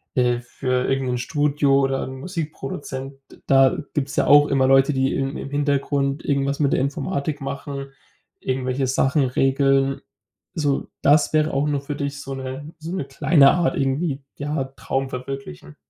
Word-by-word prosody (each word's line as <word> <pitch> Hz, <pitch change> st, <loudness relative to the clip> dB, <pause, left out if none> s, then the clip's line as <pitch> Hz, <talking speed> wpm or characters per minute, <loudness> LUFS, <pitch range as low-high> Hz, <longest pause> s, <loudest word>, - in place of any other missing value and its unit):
äh, 125 Hz, -1 st, +2 dB
für 125 Hz, +1 st, -2 dB
irgendein 130 Hz, -2 st, 0 dB
Studio 145 Hz, +1 st, +2 dB
oder 135 Hz, -1 st, 0 dB
'nen 130 Hz, 0 st, -8 dB
Musikproduzenten. 140 Hz, -5 st, -6 dB, 0.3 s
Da 135 Hz, -1 st, +4 dB, 0.2 s
gibt's 140 Hz, -1 st, -2 dB
ja -, -, +2 dB
auch 145 Hz, 0 st, +7 dB
immer 135 Hz, -1 st, +2 dB
Leute, 135 Hz, +2 st, +5 dB
die 130 Hz, 0 st, +1 dB
im 135 Hz, 0 st, -2 dB
im -, -, -6 dB
Hintergrund 140 Hz, 0 st, 0 dB
irgendwas 140 Hz, 0 st, 0 dB
mit 145 Hz, -2 st, +2 dB
der -, -, +2 dB
Informatik 140 Hz, +2 st, -2 dB
machen, 140 Hz, 0 st, -5 dB, 0.5 s
irgendwelche 130 Hz, +1 st, -1 dB
Sachen 135 Hz, +2 st, +2 dB
regeln. 135 Hz, +1 st, +2 dB, 0.5 s
So, 145 Hz, -3 st, 0 dB, 0.2 s
das 150 Hz, +2 st, +4 dB
wäre 155 Hz, 0 st, +2 dB
auch 140 Hz, +2 st, +1 dB
nur 145 Hz, -2 st, 0 dB
für 145 Hz, +1 st, -5 dB
dich 140 Hz, 0 st, -4 dB
so 135 Hz, -1 st, -6 dB
'ne 135 Hz, +4 st, -7 dB
so 165 Hz, +3 st, -6 dB
'ne 165 Hz, -, -3 dB
kleine 140 Hz, +1 st, +5 dB
Art 175 Hz, -1 st, +1 dB
irgendwie, 140 Hz, +2 st, -1 dB, 0.2 s
ja, 145 Hz, 0 st, -2 dB
Traum 135 Hz, 0 st, -2 dB
verwirklichen. 125 Hz, -, -7 dB
135 Hz, 160 wpm, -22 LUFS, 135-145 Hz, 0.5 s, auch